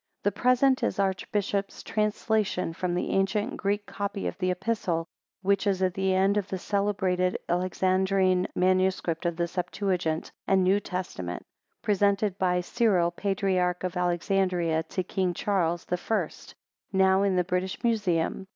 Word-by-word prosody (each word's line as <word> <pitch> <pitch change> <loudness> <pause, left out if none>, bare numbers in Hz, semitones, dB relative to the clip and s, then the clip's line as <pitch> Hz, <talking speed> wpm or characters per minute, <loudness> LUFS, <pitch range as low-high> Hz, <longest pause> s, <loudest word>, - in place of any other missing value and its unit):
The 205 - +2
present 255 +5 +3
is - - 0
the 200 - +2
Archbishop's 195 +1 -2
translation 210 -4 0
from 175 +1 -2
the 180 - -1
ancient 205 +6 0
Greek 205 +1 -1
copy 200 -1 -4
of - - -2
the 185 -1 +1
Epistle, 180 -3 -1 0.4
which 200 +1 +2
is 190 -1 +1
at 185 -1 +1
the 190 -1 +1
end 195 +2 +3
of 200 -2 -1
the 190 - -3
celebrated 190 -2 0
Alexandrine 185 +1 +2
MS. 185 +1 +2 0.2
of 170 -1 0
the 170 0 -1
Septuagint 180 -2 -2 0.2
and 190 -1 +4
New 190 +2 +4
Testament, 175 - -5 0.4
presented 200 -1 +1
by 180 -1 +2
Cyril, 185 -4 +2
patriarch 185 -1 0
of 185 0 -3
Alexandria, 175 -2 +1
to 185 - -2
King 185 -1 -1
Charles 175 -4 0
the 180 - -1
First, 190 -3 -3 0.4
now 190 0 +4
in 200 -2 +2
the 180 - +3
British 180 +3 -2
Museum. 195 -6 0
190 Hz, 150 wpm, -27 LUFS, 180-200 Hz, 0.4 s, and